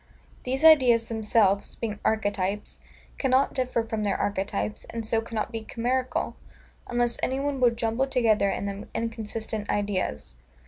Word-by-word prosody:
These 265 Hz, +3 st, -2 dB
ideas 255 Hz, -8 st, +6 dB
themselves, 210 Hz, -3 st, +2 dB
being 210 Hz, -3 st, -4 dB
archetypes, 205 Hz, -2 st, -1 dB, 0.4 s
cannot 265 Hz, 0 st, +2 dB
differ 255 Hz, -3 st, 0 dB
from 220 Hz, -1 st, -3 dB
their 205 Hz, -2 st, 0 dB
archetypes, 105 Hz, -, -2 dB
and 230 Hz, -1 st, -5 dB
so 225 Hz, +1 st, +1 dB
cannot 225 Hz, -1 st, -3 dB
be 225 Hz, -1 st, -4 dB
chimerical, 250 Hz, +3 st, -1 dB, 0.5 s
unless 240 Hz, -1 st, 0 dB
any 265 Hz, +1 st, 0 dB
one 280 Hz, -1 st, -1 dB
will 250 Hz, -1 st, +6 dB
jumble 230 Hz, +3 st, -1 dB
together 220 Hz, -6 st, +3 dB
in 200 Hz, -, -2 dB
them 200 Hz, +1 st, -5 dB
inconsistent 220 Hz, -2 st, -4 dB
ideas. 190 Hz, -, -2 dB
225 Hz, 140 wpm, -26 LUFS, 205-245 Hz, 0.5 s, ideas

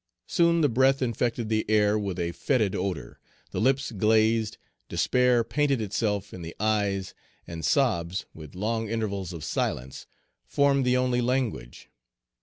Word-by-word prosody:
Soon 170 Hz, -2 st, +3 dB
the 150 Hz, -, +4 dB
breath 135 Hz, +2 st, +3 dB
infected 120 Hz, -1 st, -1 dB
the 110 Hz, 0 st, +1 dB
air 105 Hz, -1 st, +3 dB
with 100 Hz, -4 st, -2 dB
a 85 Hz, -1 st, -1 dB
fetid 110 Hz, 0 st, 0 dB
odor, 95 Hz, -5 st, -4 dB, 0.3 s
the -, -, -2 dB
lips 135 Hz, +2 st, +1 dB
glazed, 110 Hz, +1 st, +2 dB, 0.3 s
despair 125 Hz, -2 st, +2 dB
painted 140 Hz, +2 st, 0 dB
itself 105 Hz, -1 st, -2 dB
in 90 Hz, -, -8 dB
the 85 Hz, 0 st, -8 dB
eyes, 100 Hz, -3 st, 0 dB, 0.3 s
and 85 Hz, -1 st, -7 dB
sobs, 95 Hz, -, +1 dB
with 75 Hz, -1 st, -11 dB
long 110 Hz, +3 st, -2 dB
intervals 100 Hz, -5 st, -2 dB
of 85 Hz, -4 st, -7 dB
silence, 65 Hz, +2 st, -3 dB, 0.4 s
formed 140 Hz, -, +2 dB
the 125 Hz, 0 st, +3 dB
only 125 Hz, -1 st, +1 dB
language. 120 Hz, -, -2 dB
110 Hz, 145 wpm, -26 LUFS, 95-125 Hz, 0.4 s, the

